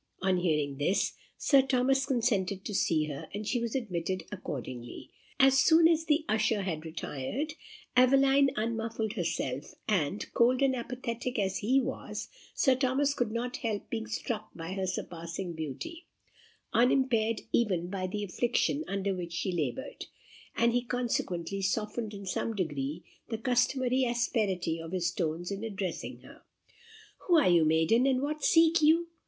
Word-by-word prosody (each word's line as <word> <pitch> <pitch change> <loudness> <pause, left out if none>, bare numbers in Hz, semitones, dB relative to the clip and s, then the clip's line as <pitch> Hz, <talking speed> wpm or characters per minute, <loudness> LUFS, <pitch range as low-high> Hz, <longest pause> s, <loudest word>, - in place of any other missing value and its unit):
On 190 -1 +3
hearing 150 -5 0
this, 180 +7 +1 0.2
Sir 275 -2 +5
Thomas 270 +1 +2
consented 210 -7 0
to 210 - -4
see 160 -5 +2
her, 145 -2 -7
and 210 +1 -4
she 245 - +1
was 235 +1 -3
admitted 185 -6 -2
accordingly. 130 - -7 0.3
As 270 -1 +6
soon 325 +3 +6
as 325 -1 +2
the 310 -1 +2
usher 215 -1 +1
had 165 -5 -3
retired, 160 - -4 0.4
Aveline 270 +2 +5
unmuffled 225 0 -2
herself, 155 - -3
and, 190 -2 0
cold 250 +3 +3
and 265 -1 +3
apathetic 245 0 -4
as 195 -2 0
he 255 +6 +3
was, 265 0 -4 0.3
Sir 265 - +4
Thomas 265 +2 +1
could 245 -6 -1
not 245 +2 -3
help 215 -3 -3
being 225 -1 -3
struck 220 -1 -4
by 165 +2 -5
her 190 -1 -2
surpassing 170 0 -4
beauty, 160 - -6 0.7
unimpaired 230 -2 +3
even 185 -7 +1
by 185 0 -3
the 205 +3 -3
affliction 245 - 0
under 195 0 -1
which 175 -2 -5
she 185 +3 -1
laboured; 150 -8 -3 0.5
and 235 0 +3
he 245 - +2
consequently 195 -7 -2
softened 210 +3 -1
in 200 0 -8
some 220 +4 -2
degree 150 -3 -3 0.3
the 225 - -2
customary 255 +1 +1
asperity 210 -8 0
of 165 +2 -8
his 175 -2 0
tones 175 -1 -2
in 200 +2 -4
addressing 195 -5 -4
her. - - -15 0.9
"Who 350 -3 +6
are 290 -12 +5
you, 170 -2 +5
maiden, 160 +11 +3
and 265 0 +2
what 300 +1 -3
seek 330 0 +5
you?" 330 +3 +4
220 Hz, 155 wpm, -30 LUFS, 180-255 Hz, 0.9 s, As